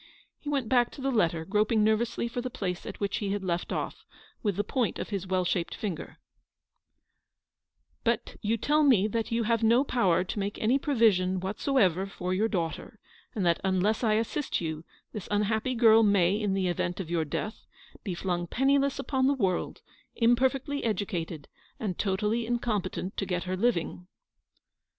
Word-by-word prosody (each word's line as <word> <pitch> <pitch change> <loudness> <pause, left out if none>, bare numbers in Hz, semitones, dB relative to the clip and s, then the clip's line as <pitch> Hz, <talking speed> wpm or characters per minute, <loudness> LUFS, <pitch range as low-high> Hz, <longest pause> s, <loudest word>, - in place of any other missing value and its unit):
He 295 - -6
went 275 -5 0
back 245 0 +3
to - - -9
the 270 0 0
letter, 170 -8 +1
groping 210 +3 +2
nervously 220 +2 +1
for 245 +1 -4
the 255 - -4
place 195 -8 -4
at - - -7
which 200 -1 -1
he 200 -2 -2
had 205 -1 -3
left 175 -1 -2
off, - - -4 0.4
with 205 -4 0
the 205 - 0
point 245 +1 -1
of - - -5
his 195 -3 -3
well 185 -1 +1
shaped 175 -1 -1
finger 190 -7 -5 0.7
— - - -54
" - - -47
But - - -1
you 225 +2 0
tell 300 +7 +2
me 240 -9 +5
that 225 +1 -2
you 230 0 +1
have 230 +1 +1
no 230 +4 +4
power 190 -11 +2
to 185 - -4
make 200 +1 -3
any 245 +5 +2
provision 205 -10 +2
whatsoever 195 - +1
for 185 -2 -4
your 210 +4 +2
daughter; 170 -1 -3 0.4
and 200 -4 0
that, 170 -1 +2
unless 190 +4 +1
I 220 -2 +3
assist 230 +6 -1
you, 160 -2 -4 0.3
this 210 -4 -6
unhappy 215 +4 0
girl 225 -1 +6
may, 200 -4 +4
in 205 -2 0
the 190 -1 0
event 175 +1 -2
of 170 -3 -5
your 165 -2 +1
death, 210 +8 -5 0.4
be 190 -5 -3
flung 175 -1 -2
penni 270 +8 +3
less 275 0 0
upon 265 -1 0
the 280 - +3
world, 190 -8 -1 0.3
imperfectly 265 +4 +1
educated, 180 -8 -3 0.3
and 195 -6 -3
totally 210 +4 0
incompetent 210 -6 -2
to 195 - -1
get 180 -1 -1
her 185 0 -2
living." 180 -4 -1
210 Hz, 185 wpm, -28 LUFS, 185-235 Hz, 0.7 s, girl